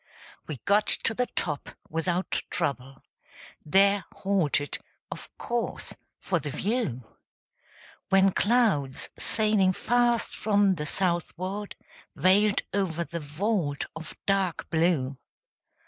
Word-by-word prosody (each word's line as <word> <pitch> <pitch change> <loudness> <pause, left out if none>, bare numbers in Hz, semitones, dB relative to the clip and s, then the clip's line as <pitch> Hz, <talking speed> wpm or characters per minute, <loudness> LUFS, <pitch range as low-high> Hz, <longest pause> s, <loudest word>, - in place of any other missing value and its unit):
We 150 - -5
got 205 +1 +3
to 225 - +3
the 250 +2 0
top 150 -4 -3 0.2
without 175 +3 -1
trouble; 135 -1 -3 0.6
There 195 +3 +4
halted, 165 -7 0 0.3
of - - -7
course, 240 -1 -3 0.3
for 180 -3 0
the 145 - -5
view; 195 - -2 1.1
When 195 0 +5
clouds, 205 - +1
sailing 210 -4 +3
fast 240 +2 +1
from 205 -2 +3
the 150 -4 -3
southward, 185 +3 -1 0.4
Veiled 195 +6 +4
over 175 -4 0
the 170 0 -5
vault 150 0 -1
of 165 0 -7
dark 195 -3 0
blue. 160 -6 +1
185 Hz, 105 wpm, -27 LUFS, 155-205 Hz, 1.1 s, When